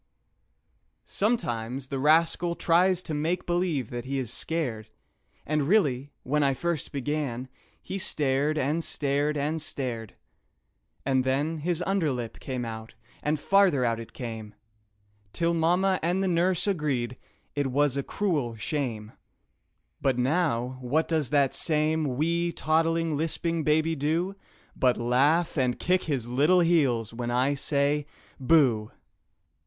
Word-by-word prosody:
Sometimes 130 - -1
the 135 - -3
rascal 165 +4 +3
tries 180 +2 +3
to 160 - -4
make 160 +4 -1
believe 175 -8 -1
that 120 -1 -4
he 135 +1 -2
is 125 -3 -2
scared, 125 -12 -2 0.6
And 150 -2 0
really, 145 -9 +2
when 150 +3 +1
I 135 -2 +2
first 170 +1 -2
began, 140 -3 -3 0.3
he 195 - -4
stared, 145 -2 0
and 150 +4 0
stared, 145 +1 0
and 150 +3 -1
stared; 120 -8 -4 0.9
And 130 -1 +2
then 145 +5 0
his 175 +2 -1
under 190 -6 +1
lip 120 -3 -5
came 130 -3 -4
out 110 -1 -7 0.3
and 150 0 0
farther 190 -8 +3
out 115 -1 0
it 115 - -9
came, 110 -4 -7 0.8
Till 170 0 +1
mamma 180 +3 +2
and 180 +4 +1
the - - +1
nurse 180 0 +2
agreed 145 - -1 0.4
it 145 -1 0
was 140 +1 +1
a 140 - 0
"cruel 145 - -1
shame" 110 -1 -3 0.9
But 130 -2 +1
now 130 -3 0
what 145 +6 +1
does 155 -6 0
that 140 -2 +2
same 155 -3 0
wee, 170 +3 +1
toddling, 165 0 +1
lisping 165 +2 -1
baby 155 +2 +2
do 165 +7 -1 0.4
But 125 -2 +2
laugh 145 +8 +2
and 125 -2 +1
kick 185 +1 +1
his 135 -7 -2
little 150 +9 +4
heels 135 -10 +2
when 120 0 -4
I 130 +4 +2
say 145 +1 0 0.3
"Booh!" 125 -6 +3
145 Hz, 140 wpm, -27 LUFS, 125-165 Hz, 0.9 s, little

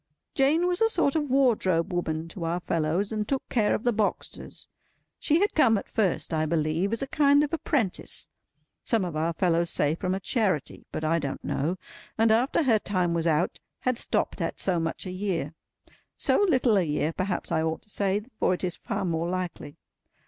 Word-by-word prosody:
Jane 300 +5 +3
was 360 +2 0
a 450 - +5
sort 340 -9 +1
of 295 -3 0
wardrobe 215 -11 +2
woman 160 -2 -2
to 170 +1 -7
our 165 +2 -1
fellows, 170 +4 -1
and 215 -1 -2
took 270 +1 -2
care 215 -4 +2
of - - -4
the 240 - +2
boxes. 215 -1 -3 0.5
She 310 +2 +2
had 410 - +2
come 230 -8 +4
at - - -5
first, 190 -5 0
I 155 0 +1
believe, 160 +4 0
as 230 +3 -1
a - - -4
kind 285 0 +4
of 295 - -3
apprentice—some 210 - -2
of 170 -3 -5
our 160 +2 0
fellows 170 0 +1
say 145 +1 +3
from 185 +3 -2
a - - -3
Charity, 195 - -1
but - - -4
I 165 +2 +2
don't 140 -3 -4
know—and 185 +8 -2
after 245 +8 +2
her 230 -6 +3
time 180 -4 0
was 170 0 0
out, 165 +2 +1 0.2
had 255 -2 0
stopped - - -1
at - - -3
so 180 -3 +1
much 165 +3 -3
a 185 - -4
year. 185 -5 -2 0.6
So 410 - +3
little 255 -7 +3
a - - +4
year, 150 0 -1
perhaps 185 +1 -2
I 160 - +2
ought 160 0 -2
to - - -22
say, 200 +1 0 0.2
for 185 - +2
it - - -10
is 180 -1 -2
far - - -3
more 170 -1 -1
likely. 180 -5 -4
185 Hz, 195 wpm, -27 LUFS, 165-235 Hz, 0.6 s, a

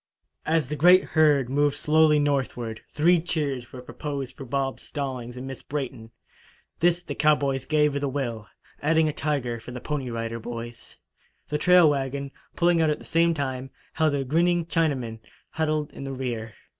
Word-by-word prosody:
As 160 -3 +2
the 150 - -3
great 180 +5 +6
herd 150 -5 +3
moved 145 +2 +1
slowly 155 0 +4
northward, 130 -6 -1
three 170 +4 +3
cheers 140 -7 -2
were 125 -1 -9
proposed 140 -1 -5
for 135 - -8
Bob 135 +1 -2
Stallings 130 -4 -5
and 125 - -6
Miss 135 -1 -7
Brayton. 130 -6 -5 0.7
This 175 +1 +2
the - - -5
cowboys 140 -4 +2
gave 150 -2 +2
with 140 - -2
a 140 - 0
will, 120 -6 -3 0.3
adding 160 +1 +3
a 155 - -1
tiger 135 -7 -2
for 110 - -11
the 125 0 -6
Pony 140 -1 -3
Rider 115 0 -4
Boys. 115 0 -8 0.5
The 150 - -1
trail 180 0 +6
wagon, 140 -1 -1 0.2
pulling 170 -1 +3
out 160 - +3
at 150 - 0
the - - -14
same 165 0 +2
time, 135 -2 -3 0.2
held 155 -2 +2
a 140 - 0
grinning 170 +5 +2
Chinaman, 140 -10 -1 0.3
huddled 155 -1 -1
in - - -8
the 135 0 -4
rear. 115 -4 -4
140 Hz, 175 wpm, -25 LUFS, 125-155 Hz, 0.7 s, great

